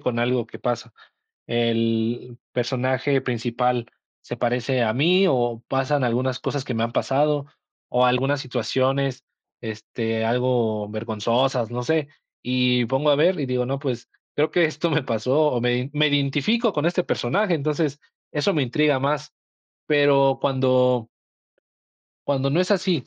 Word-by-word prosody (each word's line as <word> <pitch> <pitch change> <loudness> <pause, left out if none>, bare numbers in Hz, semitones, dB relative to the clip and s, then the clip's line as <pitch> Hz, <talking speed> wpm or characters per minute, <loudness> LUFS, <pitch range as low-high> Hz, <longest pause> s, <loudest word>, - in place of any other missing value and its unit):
con 120 -2 -2
algo 120 0 +1
que - - -12
pasa, 120 -1 -3 0.6
el 115 +1 0
personaje 130 +2 0
principal 120 -1 -1 0.3
se - - -7
parece 125 +1 0
a 110 -1 +1
mí, 180 +8 +4
o 120 -4 0
pasan 135 +1 0
algunas 125 +2 0
cosas 140 -2 -3
que 130 -3 -4
me 115 - 0
han 115 - -2
pasado, 145 +2 +1 0.4
o 125 +1 +3
algunas 135 +3 +2
situaciones, 130 +1 -1 0.4
este, 110 0 -3
algo 115 -3 0
vergonzosas, 115 +3 -1
no 125 +1 -3
sé, 155 +3 0 0.4
y 125 -1 +2
pongo 135 +5 +1
a 145 - +5
ver 170 +5 +3
y 140 - -2
digo: 125 -1 0
"No, 135 +2 -2
pues, 125 -4 -4 0.3
creo 155 +1 +1
que 175 -2 +4
esto 160 +1 -2
me 160 - +2
pasó 125 +5 0
o 125 - -1
me 120 0 +2
ide 125 +2 -2
me 150 0 +3
identifico 145 - +1
con 150 -1 -1
este 175 +1 +1
personaje", 180 - 0
entonces 150 0 -1 0.3
eso 155 +7 +1
me 150 - +1
intriga 145 +2 +2
más, 150 +2 -2 0.5
pero 140 -2 +4
cuando 130 -3 +2 1.2
cuando 140 -1 +1
no 165 +6 +2
es 185 - 0
así, 180 -8 +1
130 Hz, 155 wpm, -23 LUFS, 120-145 Hz, 1.2 s, a